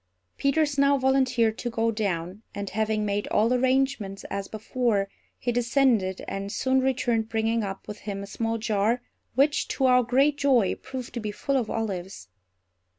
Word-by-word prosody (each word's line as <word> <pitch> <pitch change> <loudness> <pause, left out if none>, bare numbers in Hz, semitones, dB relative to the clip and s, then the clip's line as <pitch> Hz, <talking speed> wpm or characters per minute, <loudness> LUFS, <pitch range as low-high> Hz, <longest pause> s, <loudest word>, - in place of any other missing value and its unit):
Peters 285 0 +1
now 280 0 +5
volunteered 255 -4 +2
to 240 - -2
go 230 0 0
down; 190 -3 -2
and, 200 -1 -4
having 215 +1 0
made 205 0 -1
all 225 +4 +2
arrangements 255 -5 +1
as 195 0 -3
before, 220 -2 0 0.3
he 245 - -1
descended, 235 -5 +1
and 195 0 -4
soon 260 +4 +1
returned 240 -4 0
bringing 225 +1 +1
up 195 -1 -6
with 210 - -7
him 200 -1 -5
a - - -5
small 225 +3 -2
jar, 220 +2 0 0.3
which, 285 +3 +3
to 270 - 0
our 250 -1 +6
great 270 +5 +2
joy, 250 -9 +3
proved 260 -2 -7
to 240 - -3
be 215 -2 -3
full 275 +6 -2
of 240 -5 0
olives. 190 - -4
230 Hz, 165 wpm, -26 LUFS, 205-260 Hz, 0.3 s, our